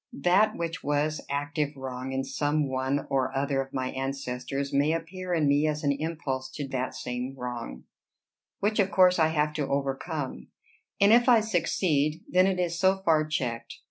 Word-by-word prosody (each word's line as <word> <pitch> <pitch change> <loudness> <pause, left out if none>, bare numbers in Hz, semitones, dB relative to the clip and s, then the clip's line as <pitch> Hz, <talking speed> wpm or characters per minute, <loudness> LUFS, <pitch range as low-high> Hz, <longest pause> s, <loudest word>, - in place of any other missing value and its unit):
That 200 +5 +4
which 170 +1 -4
was 145 +2 0
active 145 +1 -2
wrong 130 0 -5
in 135 0 -1
some 145 +2 0
one 130 +2 -1
or 135 -1 0
other 135 0 0
of 135 0 -8
my 130 -2 -2
ancestors, 135 +1 -4
may 145 +3 +3
appear 180 +3 -5
in 160 -4 +2
me 145 +2 +3
as 155 +1 -2
an 140 - +3
impulse 140 -3 -3
to 145 -2 -4
that 130 -1 -3
same 125 +2 -4
wrong, 120 - -6 0.8
which 210 +2 +1
of 195 -1 +3
course 185 -2 +5
I 160 - +5
have 150 -1 0
to 150 -3 -2
overcome; 140 - -3 0.5
and 200 +2 +6
if 240 +2 +5
I 240 -2 +7
succeed, 165 -6 0
then 185 +1 +4
it 190 -1 0
is 170 -2 -1
so 190 +1 +2
far 155 -3 +3
checked. 125 -6 -3
145 Hz, 175 wpm, -27 LUFS, 135-170 Hz, 0.8 s, I